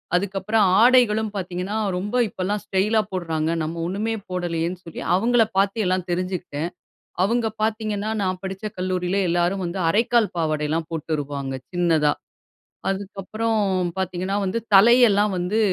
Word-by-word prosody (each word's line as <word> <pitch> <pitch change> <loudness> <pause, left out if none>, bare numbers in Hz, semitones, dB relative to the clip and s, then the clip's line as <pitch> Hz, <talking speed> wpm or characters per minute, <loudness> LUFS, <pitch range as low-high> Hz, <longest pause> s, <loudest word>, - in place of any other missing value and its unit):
அதுக்கப்புறம் 200 +3 +1 0.2
ஆடைகளும் 225 -4 +4
பாத்தீங்கன்னா, 185 +2 -3 0.2
ரொம்ப 205 +6 -3
இப்பலாம் 200 +3 -2
ஸ்டைலா 210 +2 +2
போடுறாங்க. 165 -4 -2
நம்ம 165 +2 -4
ஒண்ணுமே 210 +5 -2 0.2
போடலையேன்னு 175 0 -2
சொல்லி, 165 - -7
அவுங்களை 230 +3 +3
பாத்து 200 +3 +2
எல்லாம் 185 -1 0
தெரிஞ்சுக்கிட்டேன். 175 -3 -3 0.5
அவுங்க 230 +2 +1 0.2
பாத்தீங்கன்னா, 215 -1 -1
நான் 185 -1 -1
படிச்ச 190 +2 -6
கல்லூரியிலே 185 +1 -1
எல்லாரும் 175 +3 +1
வந்து 175 +3 -4
அரைக்கால் 230 +2 +2
பாவாடைலாம் 155 0 -1
போட்டுருவாங்க, 145 -4 -3 0.2
சின்னதா. 165 -4 +2 0.8
அதுக்கு 195 +1 -4
அப்புறம் 225 +2 -1 0.4
பாத்தீங்கன்னா 185 +1 -2
வந்து, 190 +4 -1 0.2
தலையெல்லாம் 210 -1 +6
வந்து 180 +5 0
190 Hz, 120 wpm, -23 LUFS, 175-210 Hz, 0.8 s, தலையெல்லாம்